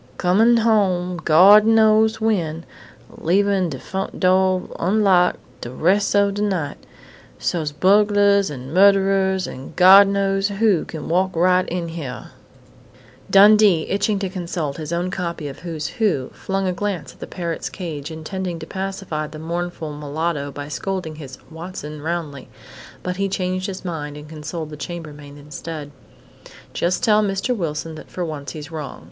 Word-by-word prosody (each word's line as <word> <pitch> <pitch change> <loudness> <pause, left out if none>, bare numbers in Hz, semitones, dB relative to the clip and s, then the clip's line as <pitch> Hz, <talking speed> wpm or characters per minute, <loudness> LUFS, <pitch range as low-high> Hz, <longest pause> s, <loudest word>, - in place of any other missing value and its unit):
Comin' 220 +6 +4
home 190 -6 +1
Gawd 190 +7 +7
knows 220 0 +4
when, 170 -8 -1 0.5
leavin' 195 +1 +1
de 135 - -5
front 190 +7 -5
do' 185 0 +2
unlocked 185 -1 +3 0.2
de 120 - -6
res' 185 +11 +1
o' 200 0 +4
de 205 +1 -4
night, 185 -9 -1 0.6
so's 155 -4 -2
bugglers 200 +3 +3
and 135 0 -8
murderers 195 0 +3
and 130 +1 -9
Gawd 190 +2 +8
knows 195 0 +1
who 205 -3 +1
could 155 -3 -7
walk 185 +2 0
right 180 +2 +3
in 175 -1 -3
hyar 155 -6 -7 0.5
" 125 +1 -26
Dundee, 205 -4 +6
itching 200 +1 0
to 195 0 -2
consult 170 -6 -4
his 155 -1 -6
own 175 +2 -1
copy 170 -5 -4
of 135 - -8
"Who's 165 -3 -5
Who", 205 - -1
flung 195 0 -3
a 185 - 0
glance 200 -1 -4
at - - -24
the - - -7
parrot's 170 -3 -4
cage, 155 -6 -6
intending 170 +3 -5
to - - -8
pacify 190 -5 -4
the 155 +1 -10
mournful 165 -1 -4
mulatto 150 0 -3
by 145 +1 -7
scolding 180 -1 -4
his 135 -4 -9
"Watson" 160 -3 -8
roundly. 160 -3 -4 0.5
But 180 0 -3
he 195 0 -1
changed 185 0 -2
his 190 -1 -7
mind 150 -4 -5
and 150 0 -10
consoled 155 +1 -6
the 150 - -8
chambermaid 150 -4 -8
instead: 150 +1 -8 0.8
"Just 180 +7 -1
tell 215 -3 +4
Mr. 200 +4 -1
Wilson 160 -4 -4
that 155 - -11
for 180 - -4
once 150 -3 -6
he's 155 -1 -9
wrong. 155 -3 -6
180 Hz, 155 wpm, -21 LUFS, 155-195 Hz, 0.8 s, Gawd